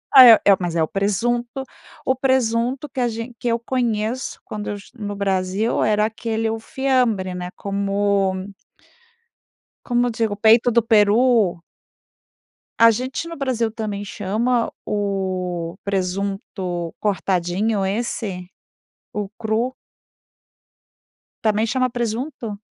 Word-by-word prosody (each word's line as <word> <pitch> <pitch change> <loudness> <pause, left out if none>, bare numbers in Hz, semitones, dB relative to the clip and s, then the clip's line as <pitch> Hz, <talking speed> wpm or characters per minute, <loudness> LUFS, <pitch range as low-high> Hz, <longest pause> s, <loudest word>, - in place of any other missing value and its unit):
Ah, 260 - +12
é 235 - +11
é 200 - +7
mas, 175 -2 -2
é 165 - +3
o - - 0
presunto 240 +6 -1 0.4
o 260 - +2
presunto 255 +1 +1
que 265 -1 -6
a 245 - +2
gen 230 +2 -5
que 245 - -3
eu 230 0 +2
conheço 235 -1 -2
quando 210 -1 -6
eu 205 - -2
est 205 +4 -13
no 205 -3 -5
Brasil 195 +2 0
era 210 0 +3
aquele 225 0 -2
o 225 - -3
fiambre 235 -7 0
né, 180 0 -5
como 200 -1 0 1.3
como 245 0 +2
digo 225 -2 -1
o - - -7
peito 225 +3 +5
do 235 +1 +4
peru. 215 -3 +3 1.2
A 230 - +8
gente 255 +8 -3
no 335 -2 -7
Brasil 240 -5 0
também 210 -2 -4
chama 220 +5 -1
o 185 -4 -2
presunto 190 -2 -3
cortadinho 195 +1 0
esse, 195 -3 -3 0.6
o 210 -1 -3
cru 230 +3 0 1.7
também 215 +1 +2
chama 255 +1 +1
presunto? 235 -1 -3
215 Hz, 125 wpm, -21 LUFS, 195-240 Hz, 1.7 s, Ah